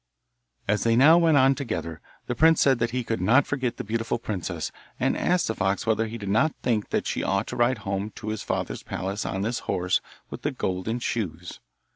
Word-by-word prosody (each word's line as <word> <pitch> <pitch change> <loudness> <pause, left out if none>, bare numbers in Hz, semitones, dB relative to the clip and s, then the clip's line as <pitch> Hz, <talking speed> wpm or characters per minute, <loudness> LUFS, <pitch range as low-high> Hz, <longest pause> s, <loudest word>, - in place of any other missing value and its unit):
As 105 +1 +1
they 115 0 +3
now 155 +7 +7
went 165 -3 +4
on 135 0 +5
together 110 - -4 0.2
the - - -2
prince 160 +4 +4
said 135 -3 +4
that 120 - +1
he 125 +1 -2
could 115 -4 -2
not 115 +9 +4
forget 130 -4 -2
the 125 - -4
beautiful 115 +1 -1
princess, 90 -7 -4 0.3
and - - +1
asked 180 -1 +1
the 110 - 0
fox 100 -2 -1
whether 115 0 +1
he 115 +2 -6
did 100 -3 -7
not 140 +11 +2
think 110 -4 0
that - - -1
she - - -1
ought 100 +2 0
to - - -6
ride 120 +1 +2
home 100 +2 -2
to 110 - -6
his 110 -1 -3
father's - - -3
palace 95 +3 -4
on 95 +1 -2
this 115 +3 -1
horse 90 +1 +1 0.3
with - - -7
the - - 0
golden 95 +5 -2
shoes. 90 -8 -4
115 Hz, 215 wpm, -26 LUFS, 100-125 Hz, 0.3 s, now